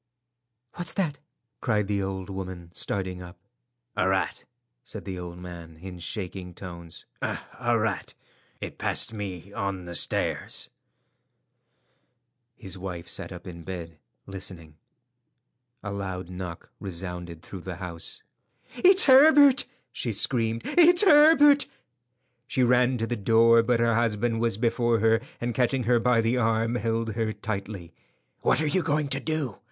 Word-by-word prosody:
"What's 175 -2 -1
that?" 165 -8 -1 0.4
cried 105 -4 0
the 100 0 -1
old 95 -1 -4
woman, 95 -3 -7
starting 95 -2 -3
up. 90 0 -11 0.6
"A 95 - +1
rat," 95 0 -1 0.4
said 110 -5 -9
the 95 -2 -5
old 90 0 -7
man 85 -2 -10
in 90 +1 -9
shaking 90 -1 -5
tones—"a 90 +7 -4
rat. 110 -3 -2 0.4
It - - -7
passed - - +1
me 100 -2 -6
on 100 -3 -3
the 85 - -7
stairs." 85 - +1 1.8
His 95 -4 -3
wife 90 -3 -6
sat - - -6
up 90 0 -9
in 85 -2 -9
bed 85 -3 -7 0.3
listening. 90 -5 -8 1.1
A 100 - -4
loud 95 -3 -5
knock 90 -2 -7
resounded 90 -2 -6
through 95 - -9
the 90 0 -6
house. 85 -2 -6 0.5
"It's 375 +8 +6
Herbert!" 280 0 +7 0.3
she 120 - -2
screamed. 115 +1 +1
"It's 350 +2 +5
Herbert!" 295 -4 +6 0.8
She 130 - +1
ran 125 +1 +3
to 115 - -1
the 120 - -2
door, 115 +2 +5
but 115 +1 +1
her 115 0 +3
husband 115 0 0
was 115 -4 +1
before 120 0 +1
her, 115 +1 +3 0.2
and 120 0 -2
catching 125 +2 +1
her 120 +1 +3
by 120 0 +3
the 115 +3 +1
arm, 115 -1 +1
held 115 -1 -1
her 110 0 -1
tightly. 100 -5 -5 0.5
"What - - +2
are 155 - 0
you 185 +5 +1
going 150 -2 0
to 140 - +1
do?" 145 -6 -3
105 Hz, 140 wpm, -26 LUFS, 90-120 Hz, 1.8 s, Herbert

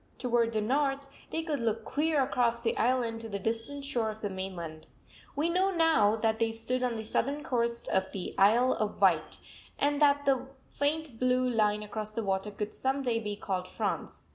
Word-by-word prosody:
Toward 235 -2 +1
the 215 - +1
north 275 +4 0 0.2
they 325 - -2
could 305 -4 -2
look 225 -1 -1
clear 300 -1 +1
across 240 -3 +1
the 230 -1 0
island 235 -2 +1
to 225 - -6
the 200 - -2
distant 230 +7 -3
shore 240 -6 0
of 215 0 -6
the 205 - -2
mainland. 175 -5 -6 0.5
We 300 +3 +1
know 370 +3 +2
now 325 - +4
that 220 0 0
they 225 -1 +2
stood 250 +3 -2
on 250 -2 0
the 220 - -4
southern 280 +6 -1
coast 235 -3 -1
of 190 0 0
the 190 - -5
Isle 235 +6 +5
of 215 -1 -2
Wight, - - +2 0.4
and 290 +1 +1
that 285 -1 +4
the 265 -2 +2 0.2
faint 290 -4 -1
blue 255 0 +2
line 210 -3 +1
across 215 0 -4
the 220 +1 -4
water 195 +1 -1
would 210 0 -3
some 270 +1 -1
day 235 -3 +1
be 210 -2 -4
called 185 -3 -3
France. - - -4
235 Hz, 195 wpm, -30 LUFS, 215-275 Hz, 0.5 s, Isle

